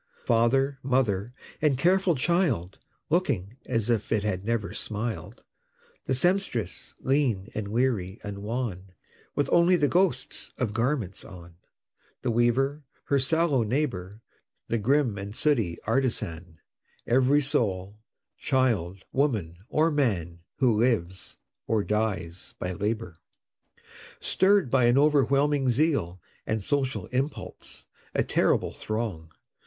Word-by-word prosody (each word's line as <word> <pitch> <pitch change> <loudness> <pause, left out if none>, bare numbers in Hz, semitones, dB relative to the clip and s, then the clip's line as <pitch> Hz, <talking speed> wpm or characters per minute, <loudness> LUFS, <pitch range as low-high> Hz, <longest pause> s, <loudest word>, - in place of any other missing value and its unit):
Father, 135 +4 +2
mother, 120 -5 +1 0.3
and 150 -4 +3
careful 180 +3 +3
child, 130 - 0 0.3
Looking 120 - 0
as 115 -3 0
if 110 -3 -1
it 110 -3 +2
had 95 -3 -2
never 110 -2 -1
smiled 110 +1 -4 0.6
The 130 - 0
Sempstress, 175 - 0
lean, 125 -8 +1
and 105 -2 -3
weary, 110 -4 0
and 100 -1 -6
wan, 105 -5 -4 0.4
With 145 - +1
only 175 +1 +5
the 150 -4 +3
ghosts 175 -6 0
of 115 -5 -1
garments 115 -4 -1
on 85 -3 -12 0.7
The 125 - +1
Weaver, 135 +5 +1 0.2
her 140 - +1
sallow 150 0 +2
neighbor, 110 -5 -2 0.5
The 115 - +1
grim 125 -2 +2
and 100 +2 -7
sooty 115 - +1
Artisan; 105 -9 -1 0.5
Every 130 +4 +4
soul 100 -7 -1 0.4
child, 100 -9 0
woman, 110 - 0
or 160 +2 +2
man, 95 - 0 0.2
Who 120 -6 +2
lives 95 -7 -1 0.3
or 110 -2 +1
dies 95 -6 -2
by 90 0 -3
labor. 105 -3 -3 1.0
Stirr'd 190 -8 +3
by 130 -2 +4
an 120 +2 +4
overwhelming 140 -1 +3
zeal, 125 - +1 0.3
And 110 -2 -1
social 135 +2 -1
impulse, 135 +3 -4 0.3
a - - +3
terrible - - +1
throng! 110 -8 -4
120 Hz, 120 wpm, -27 LUFS, 100-140 Hz, 1.0 s, only